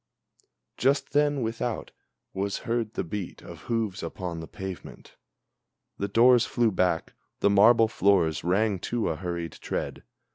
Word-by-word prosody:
Just 140 +3 +1
then, 145 -2 +2
without, 115 +1 -3 0.4
was 100 +1 -2
heard 115 -2 -1
the - - -1
beat 95 +1 -6
of - - -10
hoofs 110 -5 -1
upon 90 -3 -5
the 80 - -7
pavement, 95 +3 -9 0.8
The 100 - -1
doors 120 +4 +5
flew 120 -2 +2
back, 90 -3 0 0.3
the 100 - +4
marble 115 +3 +6
floors 95 -7 +2
rang 100 +3 +1
to 120 +5 -1
a 80 - -1
hurried 85 -1 -4
tread. - - -4
100 Hz, 140 wpm, -27 LUFS, 90-115 Hz, 0.8 s, marble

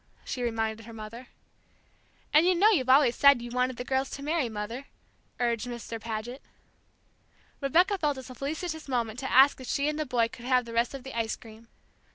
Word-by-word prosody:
she 255 - -4
reminded 225 -1 -2
her 230 - -10
mother. 225 +3 -9 1.1
"And 305 - +7
you 370 - +4
know 410 +5 +5
you've 260 - +1
always 260 -2 +5
said 280 -2 +6
you 240 0 -7
wanted 250 0 0
the 245 - -4
girls 265 +1 -1
to 280 - -9
marry, 300 -4 0
Mother," 225 +5 -6 0.5
urged 235 -1 0
Mr. 235 -2 -6
Paget. 230 +4 -5 1.2
Rebecca 355 +8 +3
felt 295 -3 +1
this 260 -1 -9
a - - -7
felicitous 315 +5 -4
moment 235 -3 -2
to 265 - -4
ask 270 +1 +6
if 255 - -9
she 280 +1 0
and 300 0 -2
the 310 - -1
boys 235 -2 +1
could 240 - -10
have 250 -1 +2
the 230 - -8
rest 235 +3 +1
of 270 - -8
the 265 -1 -8
ice 225 -1 -1
cream. 225 0 -15
250 Hz, 205 wpm, -28 LUFS, 230-280 Hz, 1.2 s, And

